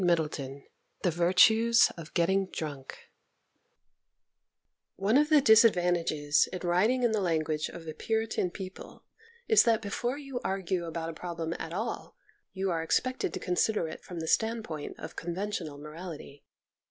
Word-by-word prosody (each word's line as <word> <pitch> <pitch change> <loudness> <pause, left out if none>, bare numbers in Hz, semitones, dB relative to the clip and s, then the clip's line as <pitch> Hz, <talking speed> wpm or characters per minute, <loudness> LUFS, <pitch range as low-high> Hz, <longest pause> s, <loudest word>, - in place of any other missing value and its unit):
XX 150 -5 -1 0.4
THE 180 - +2
VIRTUES 220 +7 +5
OF 165 -2 -10
GETTING 190 +2 +2
DRUNK 145 -6 -6 2.0
ONE 200 +5 +1
of 300 +1 +3
the 305 -2 +6
disadvantages 175 - +4
of 185 - -6
writing 210 +9 +2
in 240 - +3
the 215 -2 0
language 155 -3 0
of 170 -1 -10
a 155 - -4
Puritan 220 -3 -1
people 185 +1 -10 0.4
is 440 - +7
that 225 -2 +3
before 240 +5 -3
you 275 -4 -6
argue 190 -2 -2
about 165 0 -4
a - - -11
problem 165 -1 -4
at 160 - -5
all 220 +7 -4 0.4
you 190 -1 -2
are 165 -1 -1
expected 255 - 0
to - - -3
consider 180 0 0
it 160 - -9
from 175 -2 -7
the 160 - -5
standpoint 220 -8 -1
of - - -9
conventional 175 -3 -4
morality. 150 -1 -9
180 Hz, 145 wpm, -29 LUFS, 165-220 Hz, 2.0 s, is